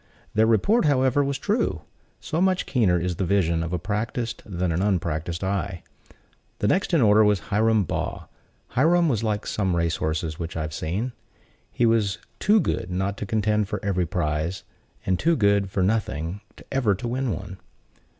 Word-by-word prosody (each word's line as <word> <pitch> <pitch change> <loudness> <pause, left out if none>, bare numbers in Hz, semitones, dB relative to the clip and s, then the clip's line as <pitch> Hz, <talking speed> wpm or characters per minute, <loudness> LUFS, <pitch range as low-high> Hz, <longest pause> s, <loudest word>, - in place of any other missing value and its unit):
Their 110 +1 +4
report, 160 - +3
however, 135 -1 +3
was 140 0 -1
true; 210 - -1 0.4
so 165 +2 -2
much 185 -1 +2
keener 100 -9 +2
is 90 -1 -2
the - - 0
vision 85 -3 +1
of 85 0 -3
a 90 - 0
practiced 110 +6 -3
than 90 -3 -1
an 85 +2 0
unpracticed 85 -3 -1
eye. 95 -2 -2 0.7
The 105 - 0
next 185 - +1
in 165 -7 +4
order 105 0 +6
was 105 -6 +1
Hiram 110 0 +3
Baugh. 85 - -3 0.4
Hiram 170 +6 +3
was 120 -8 +1
like 105 -2 -1
some 95 -4 0
race 85 -1 0
horses 80 0 -2
which 85 -1 -5
I 80 - -1
have 75 0 -5
seen; 95 +11 -2 0.6
he 120 - +1
was 110 -4 +2 0.2
too 215 +1 +4
good 90 - -1
not 95 +2 -1
to 105 - -5
contend 105 -1 +1
for - - -2
every 90 -3 0
prize, 80 +2 -2 0.4
and 95 -1 +1
too 165 +1 +3
good 100 -5 +2
for 95 -1 0
nothing 95 -3 -1 0.3
ever 125 -7 +2
to 120 +6 -5
win 130 +2 -1
one. 95 -1 -6
100 Hz, 180 wpm, -24 LUFS, 90-115 Hz, 0.7 s, order